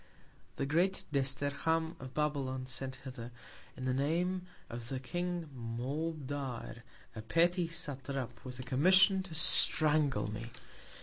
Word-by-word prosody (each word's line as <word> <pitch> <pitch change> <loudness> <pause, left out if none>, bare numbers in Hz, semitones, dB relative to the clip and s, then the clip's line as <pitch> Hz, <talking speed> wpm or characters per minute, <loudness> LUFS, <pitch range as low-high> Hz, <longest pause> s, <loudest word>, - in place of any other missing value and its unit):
The 140 - -1
grand 180 +7 +2
Desterham 145 +4 +1
of 130 0 -9
Babylon 140 -4 0
sent 130 0 -4
hither, 120 -3 -6 0.5
in 130 - -4
the 130 - +1
Name 175 +7 0 0.2
of 115 0 -6
the 135 -2 -2
King 175 +4 -2
Moabdar, 135 +1 -3 0.4
a 110 - -5
petty 170 - +3
Satrap, 140 -5 -3
with 125 -1 -6
a - - -3
Commission 185 +9 +5
to 185 -4 -8
strangle 150 -6 +4
me. 110 +3 -5
140 Hz, 125 wpm, -34 LUFS, 130-165 Hz, 0.5 s, Commission